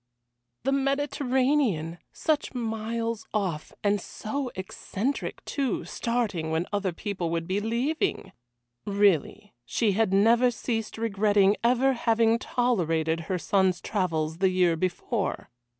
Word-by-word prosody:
The 270 - +1
Mediterranean! 270 - +1
Such 305 -4 -1
miles 230 -1 -3
off 180 -7 -2
and 205 -1 +2
so 260 +8 -4
eccentric, 200 +6 -4
too, 275 -3 -1
starting 220 -9 -1
when 160 +2 0
other 200 -2 0
people 185 -1 -3
would 165 0 -2
be 190 +2 0
leaving! 240 - -1 0.5
Really, 200 -1 +1
she 210 - +1
had 205 0 +1
never 230 +5 +5
ceased 225 -2 -3
regretting 205 -2 +3
ever 255 +3 +3
having 230 -1 +2
tolerated 165 -12 0
her 185 - +1
son's 190 0 +2
travels 165 -5 -1
the 190 0 +4
year 180 -2 +3
before. 185 - -2
210 Hz, 120 wpm, -27 LUFS, 185-240 Hz, 0.5 s, never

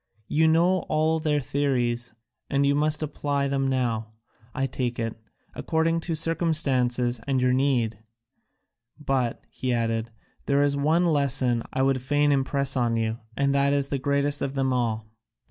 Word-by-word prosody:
You 160 +1 +3
know 170 +4 +3
all 155 +1 +2
their 150 -2 +1
theories, 125 -4 -1 0.4
and 140 0 +2
you 140 - +3
must 150 +2 +1
apply 145 -1 -1
them 135 -1 0
now, 115 -4 -1 0.4
I 135 +1 -1
take 125 -2 -3
it, 115 -1 -3 0.4
according 165 +1 0
to 165 0 -3
circumstances 130 -7 +1
and 135 -2 +1
your 125 0 +2
need. 125 -5 +1 1.0
But," 130 -5 -1
he 130 - -3
added, 115 -1 -1 0.4
"there 140 0 +3
is 145 0 +1
one 155 +5 +2
lesson 135 -6 +2
that - - -9
I 130 0 +1
would 135 -1 +1
fain 145 +2 +2
impress 140 0 0
on 120 -2 +1
you, 110 0 -1 0.2
and 140 0 +1
it 140 0 +3
is 140 -1 0
the 140 - -1
greatest 140 +1 0
of 135 0 -3
them 135 -1 +1
all. 115 -3 -1
135 Hz, 165 wpm, -25 LUFS, 125-145 Hz, 1.0 s, You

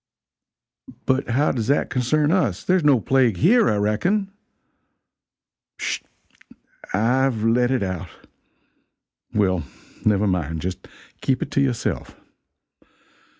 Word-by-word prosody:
"But 130 0 0
how 140 +6 +2
does 115 -4 -3
that 140 - +1
concern 145 +4 +1
us? 140 - 0
There 185 - +2
is 180 - +1
no 140 -4 +5
plague 125 -3 +2
here, 220 - +4
I - - +1
reckon." 175 - 0 1.5
"Sh! - - -2 0.9
I've 120 +2 +1
let 120 +2 +3
it 130 -5 0
out! 95 -3 -4 1.2
Well, 95 -5 +1 0.4
never 105 -1 +2
mind 80 -5 -1
just 90 +2 -5 0.3
keep 130 -1 0
it - - -9
to 140 - +1
yourself. 125 -4 -2
120 Hz, 115 wpm, -22 LUFS, 105-140 Hz, 1.5 s, no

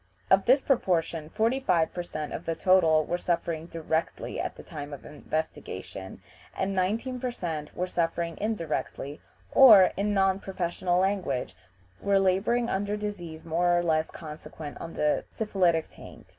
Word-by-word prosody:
Of 190 0 +5
this 260 +3 +5
proportion 165 - 0
45 220 -6 +1
per 175 - -3
cent. 155 -3 -5
of 170 - -6
the 165 - 0
total 165 -4 +4
were 175 - -2
suffering 170 -2 -2
directly 160 -1 -3
at - - -4
the - - -11
time 145 -1 -7
of 140 - -9
investigation, 145 -11 -5 0.3
and 195 +1 -1
19 220 +7 -1
per 250 - -2
cent. 160 -10 -5
were 180 - 0
suffering 170 -1 -1
indirectly, 165 -8 -3 0.3
or, 215 -9 +9
in 205 +1 0
non 195 -1 +2
professional 180 -1 -1
language, 185 - -1 0.5
were 200 0 +3
laboring 195 +6 +2
under 205 +1 -1
diseases 175 -7 -6
more 175 +2 +2
or 175 - +1
less 160 -1 +1
consequent 155 -1 -9
on 165 - -7
the 150 0 +1
syphilitic 180 -7 +1
taint. - - -13
175 Hz, 150 wpm, -28 LUFS, 160-195 Hz, 0.5 s, or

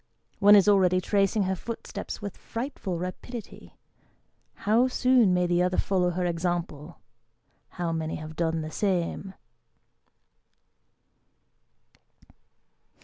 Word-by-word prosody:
One 205 +1 +8
is 200 0 +5
already 185 -3 +4
tracing 200 +2 +1
her 190 0 -1
footsteps 225 +1 -7
with 200 - -5
frightful 230 -7 -5
rapidity. 195 +6 -8 0.9
How 225 +5 +4
soon 255 -5 +3
may 180 0 +2
the 175 0 +2
other 180 0 +1
follow 185 -2 +1
her 180 +1 -2
example? 170 -2 -3 0.8
How 175 -1 -1
many 160 -1 -3
have 155 0 -8
done 165 -1 -1
the 155 0 -6
same 190 +1 -2
185 Hz, 105 wpm, -27 LUFS, 175-205 Hz, 0.9 s, One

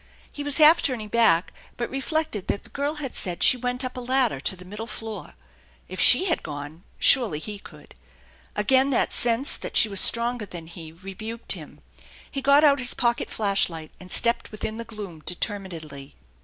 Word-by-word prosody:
He 290 - -7
was 290 -1 +2
half 315 +1 +7
turning 230 -6 -1
back, 200 -7 +3 0.2
but 235 - -4
reflected 270 - -2
that - - -2
the - - -17
girl 285 +2 -2
had 285 -4 -6
said 175 -2 -1
she - - +7
went 250 +1 -2
up 255 - -6
a - - -5
ladder 250 - +1
to 190 - -2
the 180 0 -14
middle 210 +4 -7
floor. 220 -1 -7 0.5
If - - -8
she 375 - +5
had 345 - 0
gone, 145 +3 -8
surely 235 - +4
he 205 +6 -6
could. - - -15 0.6
Again 265 0 +3
that 265 - +1
sense 240 +3 0
that - - -4
she - - +5
was 195 -2 +4
stronger 235 -2 +2
than 175 -3 -8
he 165 -1 -10
rebuked 195 +6 -6
him. - - -3 0.5
He 275 - -4
got 280 +2 +5
out 285 -2 +5
his 250 -1 -1
pocket 240 0 0
flash 200 -3 +1
light 160 -2 -9
and 185 -1 -13
stepped 235 0 +2
within 215 +1 -5
the 230 - -6
gloom 205 -8 -9
determinedly. 165 -8 -5
225 Hz, 190 wpm, -24 LUFS, 185-260 Hz, 0.6 s, half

